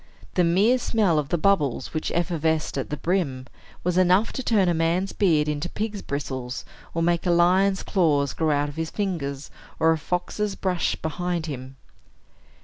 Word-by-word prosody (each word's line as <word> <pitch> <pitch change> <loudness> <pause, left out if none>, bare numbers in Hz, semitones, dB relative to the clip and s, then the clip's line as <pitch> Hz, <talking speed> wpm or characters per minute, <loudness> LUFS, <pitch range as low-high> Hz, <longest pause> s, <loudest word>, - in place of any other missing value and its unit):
The 180 - +3
mere 200 +9 +3
smell 205 -10 +2
of 145 -2 -3
the 175 - +1
bubbles, 155 -8 +1
which 155 - -2
effervesced 160 -2 0
at 135 - -3
the 150 - -3
brim, 155 -8 -1 0.4
was 180 +1 +1
enough 185 +4 +3
to - - -3
turn 215 -7 +2
a 175 - +3
man's 170 +4 0
beard 160 -7 +2
into 150 +3 -2
pig's 210 -1 -4
bristles, 130 -3 -4 0.3
or 165 - +1
make 170 +1 +1
a - - +2
lion's 185 +3 +3
claws 150 -7 +1
grow 160 -1 0
out 145 0 +1
of 145 - -9
his 160 0 -2
fingers, 150 -9 -3 0.3
or 160 +1 +4
a 160 - +1
fox's 195 +5 -2
brush 180 -3 0
behind 175 +1 -3
him. 130 -3 -7
170 Hz, 175 wpm, -24 LUFS, 150-185 Hz, 0.4 s, or